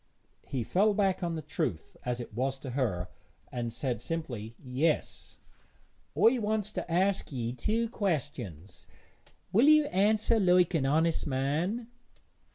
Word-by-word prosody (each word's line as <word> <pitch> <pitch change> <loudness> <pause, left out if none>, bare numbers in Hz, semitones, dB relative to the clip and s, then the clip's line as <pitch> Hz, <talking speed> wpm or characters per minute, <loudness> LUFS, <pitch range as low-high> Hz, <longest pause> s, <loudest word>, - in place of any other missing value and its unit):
He 130 -4 -2
fell 200 - +2
back 195 -2 +1
on 170 -2 -1
the 160 - -5
truth 140 - -3
as 125 0 -2
it 120 - -7
was 130 +4 -1
to 130 - -6
her, 105 -9 -1 0.4
and 120 -1 -3
said 120 -1 -3
simply, 120 -10 -4
'Yes.' 140 +5 -1 0.8
'I 240 +2 +5
wants 210 -1 -1
to 175 - -5
ask 190 +2 +1
ye 120 -3 -3
two 220 - 0
questions; 145 - -4 0.6
will 230 +8 +5
ye 305 0 +7
answer 220 -2 +2
like 180 -2 +4
an 140 -5 +1
honest 160 +3 +2
man?' 150 - -1
160 Hz, 140 wpm, -30 LUFS, 125-200 Hz, 0.8 s, ye